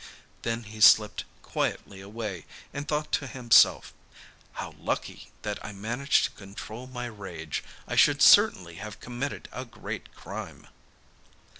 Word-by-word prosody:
Then 115 0 -2
he 110 +1 -10
slipped 105 -1 +6 0.2
quietly 95 -1 -3
away, 100 -3 -6 0.3
and 145 +1 -5
thought 150 0 -1
to 140 - 0
himself, 120 -2 +4 0.6
'How - - -6
lucky - - -4
that 105 -1 -4
I 105 - -6
managed 120 +8 +1
to - - -4
control 110 +5 -9
my 125 -1 -5
rage! 95 -9 -6 0.2
I - - -3
should - - +5
certainly 85 -2 +6
have 105 +1 -8
committed 125 +4 -5
a 130 - -5
great 115 -3 -8
crime. - - -8
110 Hz, 135 wpm, -28 LUFS, 100-125 Hz, 0.6 s, slipped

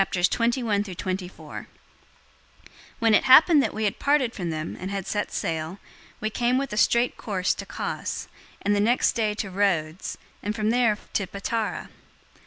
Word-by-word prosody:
021:001 195 -2 -1 1.3
When 225 -2 +3
it - - +4
happened 300 +3 +8
that - - 0
we 220 - -3
had 205 - -1
parted 280 -4 +2
from 175 -4 -4
them 155 0 -4
and 185 - -5
had 195 -2 -3
set 205 0 -2
sail, 165 0 -3 0.4
we 215 0 -2
came 245 +3 +1
with 275 -4 -2
a - - -2
straight 235 +3 +3
course 190 -4 0
to - - -8
Cos, - - -4 0.4
and 205 - +2
the - - +1
next 235 +5 +3
day 215 -3 0
to 200 -2 -4
Rhodes, 180 -4 0 0.2
and 210 +2 -3
from 215 0 +1
there 235 -3 +3 0.2
to 195 - 0
Patara. 210 +3 -3
210 Hz, 160 wpm, -25 LUFS, 190-235 Hz, 1.3 s, happened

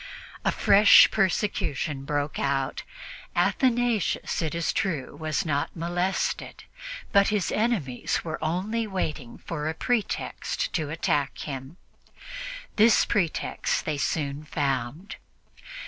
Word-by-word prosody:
A - - +2
fresh 200 -3 +7
persecution 165 -8 0
broke 145 +1 -2
out. 135 -1 -1 0.5
Athanasius, 245 -9 +1
it 160 -1 -2
is 170 -1 0
true, 155 -9 -2
was 155 +4 -2
not 145 -2 -1
molested, 175 +3 -2 0.5
but 200 -1 +5
his 210 -4 0
enemies 205 - 0
were 160 -1 -5
only 200 +8 -1
waiting 155 - -4
for 155 -2 -4
a 160 - -3
pretext 240 +3 -2
to 155 -4 -1
attack 150 -3 0
him. 135 +3 -6 1.0
This 220 +1 +6
pretext 175 -6 -1
they 150 -2 -2
soon 145 -1 -1
found. 145 - -2
160 Hz, 110 wpm, -26 LUFS, 145-200 Hz, 1.0 s, fresh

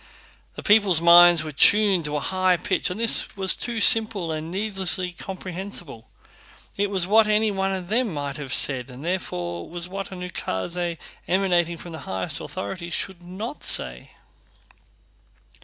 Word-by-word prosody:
The - - -9
people's 205 -5 +4
minds 170 -1 +7
were 155 - -6
tuned 195 +3 +4
to 150 0 -3
a - - 0
high 185 +2 +1
pitch 195 - -1
and 180 +4 -6
this 230 -2 +2
was 190 -1 +2
too 235 -2 -4
simple 215 -6 +4
and 155 +1 -5
needlessly 190 -2 -2
comprehensible—it 185 - -8
was 190 -3 -1
what 215 +3 +4
any 215 0 +1
one 195 -1 -2
of 185 -2 -5
them 230 0 0
might 145 -2 -5
have 140 -4 -8
said 130 -2 +3
and 130 +4 -11
therefore 90 - -4
was 175 +1 -6
what 195 +2 -7
an 185 -1 -8
ukáse 175 - -4 0.3
emanating 175 -3 0
from 175 - -10
the 160 - -8
highest 95 -1 -3
authority 170 - -6
should 180 0 -4
not 195 +10 -8
say. - - -2
180 Hz, 155 wpm, -23 LUFS, 165-195 Hz, 0.3 s, minds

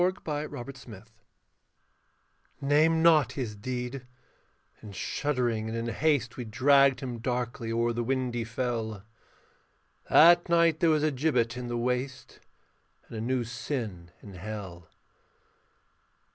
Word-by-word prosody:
THE 180 -3 -1 0.3
EARTH'S 135 +2 -8
SHAME 105 -6 -11 1.6
Name 155 +3 +3
not 160 -4 +5
his 120 -6 -4
deed: 125 +3 -5 0.7
in 105 -2 -10
shuddering 120 -1 -1
and 115 - -3
in 115 0 -3
haste 135 -2 0
We 125 - -4
dragged 135 +3 +4
him 125 -3 -5
darkly 120 -1 -3
o'er 115 +1 +1
the 120 +1 -2
windy 125 -1 -1
fell: 115 -3 -3 1.1
That 175 +2 +6
night 170 -2 +3
there 170 - +3
was 155 -1 +2
a 155 - +2
gibbet 125 -4 0
in 125 0 -5
the 120 0 -3
waste, 125 +2 -3 0.7
And - - -9
a - - -3
new 125 +1 0
sin 115 - -5
in 100 - -11
hell. 95 -3 -8
125 Hz, 130 wpm, -28 LUFS, 115-140 Hz, 1.6 s, That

